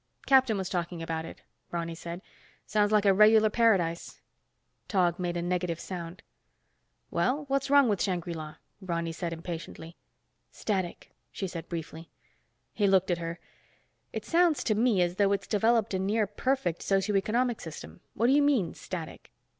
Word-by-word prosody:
"Captain 260 Hz, -5 st, +4 dB
was 190 Hz, -1 st, -3 dB
talking 175 Hz, -2 st, -3 dB
about 160 Hz, 0 st, -3 dB
it," -, -, -11 dB, 0.3 s
Ronny 170 Hz, -1 st, -3 dB
said. 170 Hz, +3 st, -7 dB, 0.4 s
"Sounds 210 Hz, -1 st, +1 dB
like 210 Hz, -1 st, +3 dB
a 195 Hz, -, +6 dB
regular 215 Hz, +2 st, +6 dB
paradise." 190 Hz, -8 st, +1 dB, 0.7 s
Tog 180 Hz, -4 st, +1 dB
made 175 Hz, -1 st, -2 dB
a 170 Hz, -, -2 dB
negative 175 Hz, -1 st, -1 dB
sound. 175 Hz, -1 st, -7 dB, 0.9 s
"Well, 255 Hz, -, 0 dB
what's 275 Hz, 0 st, 0 dB
wrong 280 Hz, -2 st, +6 dB
with 205 Hz, -4 st, 0 dB
Shangri 175 Hz, -3 st, -1 dB
La?" 155 Hz, -2 st, -7 dB, 0.3 s
Ronny 170 Hz, -3 st, -2 dB
said 170 Hz, +1 st, -4 dB
impatiently. 165 Hz, 0 st, -7 dB, 0.6 s
"Static," 190 Hz, -5 st, -3 dB, 0.2 s
she 195 Hz, -, -4 dB
said 170 Hz, -2 st, -7 dB
briefly. 165 Hz, -1 st, -6 dB, 0.6 s
He 205 Hz, -, +2 dB
looked 190 Hz, -1 st, +3 dB
at 175 Hz, -, 0 dB
her. 165 Hz, 0 st, -5 dB, 0.7 s
"It -, -, -5 dB
sounds 340 Hz, -2 st, +3 dB
to 220 Hz, -, +1 dB
me 215 Hz, -4 st, +3 dB
as 175 Hz, +1 st, -2 dB
though 200 Hz, -1 st, +3 dB
it's 200 Hz, -, -2 dB
developed 225 Hz, 0 st, +2 dB
a 190 Hz, -, 0 dB
near 210 Hz, +3 st, +1 dB
perfect 205 Hz, -4 st, -1 dB
socio 195 Hz, +1 st, +1 dB
economic 235 Hz, +4 st, +1 dB
system. 80 Hz, -, -9 dB
What 225 Hz, -, +1 dB
do 255 Hz, -, +5 dB
you 290 Hz, -, +5 dB
mean, 265 Hz, -, +2 dB
static?" 170 Hz, -4 st, -7 dB
190 Hz, 160 wpm, -29 LUFS, 170-215 Hz, 0.9 s, a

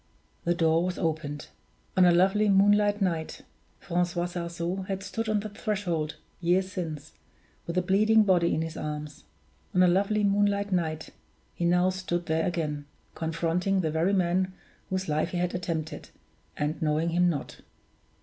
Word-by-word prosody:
The 175 Hz, -, +2 dB
door 165 Hz, 0 st, +3 dB
was 180 Hz, 0 st, -2 dB
opened. 155 Hz, -3 st, -3 dB, 0.5 s
On 185 Hz, -, +6 dB
a 175 Hz, -, +6 dB
lovely 195 Hz, +4 st, +3 dB
moonlight 205 Hz, +1 st, +4 dB
night 165 Hz, -4 st, -2 dB, 0.4 s
Francois 175 Hz, 0 st, -1 dB
Sarzeau 175 Hz, +1 st, -4 dB
had 195 Hz, -1 st, -3 dB
stood 225 Hz, +2 st, -3 dB
on 210 Hz, -1 st, +1 dB
that 210 Hz, -1 st, -8 dB
threshold, 175 Hz, -9 st, -2 dB, 0.2 s
years 185 Hz, +2 st, +1 dB
since, 160 Hz, -6 st, -5 dB, 0.6 s
with 170 Hz, +1 st, -3 dB
a 180 Hz, -, +3 dB
bleeding 215 Hz, +4 st, +4 dB
body 180 Hz, -4 st, +3 dB
in 160 Hz, -, 0 dB
his 165 Hz, -1 st, -6 dB
arms. 150 Hz, -1 st, -6 dB, 0.5 s
On 180 Hz, -, +6 dB
a -, -, +6 dB
lovely 200 Hz, +4 st, +2 dB
moonlight 200 Hz, 0 st, +2 dB
night 160 Hz, -4 st, -1 dB, 0.4 s
he 170 Hz, -, -2 dB
now 180 Hz, +2 st, +3 dB
stood 180 Hz, -2 st, -3 dB
there 160 Hz, 0 st, 0 dB
again, 150 Hz, -4 st, -2 dB, 0.3 s
confronting 170 Hz, +4 st, 0 dB
the 160 Hz, -3 st, -1 dB
very 165 Hz, +5 st, +1 dB
man 185 Hz, 0 st, +1 dB, 0.4 s
whose 190 Hz, 0 st, -2 dB
life 155 Hz, 0 st, 0 dB
he 180 Hz, -, -3 dB
had 175 Hz, 0 st, -1 dB
attempted, 165 Hz, -3 st, -4 dB, 0.5 s
and 150 Hz, +4 st, -2 dB
knowing 155 Hz, +1 st, +1 dB
him 175 Hz, +1 st, +3 dB
not. 150 Hz, -5 st, -4 dB
175 Hz, 160 wpm, -28 LUFS, 165-190 Hz, 0.6 s, On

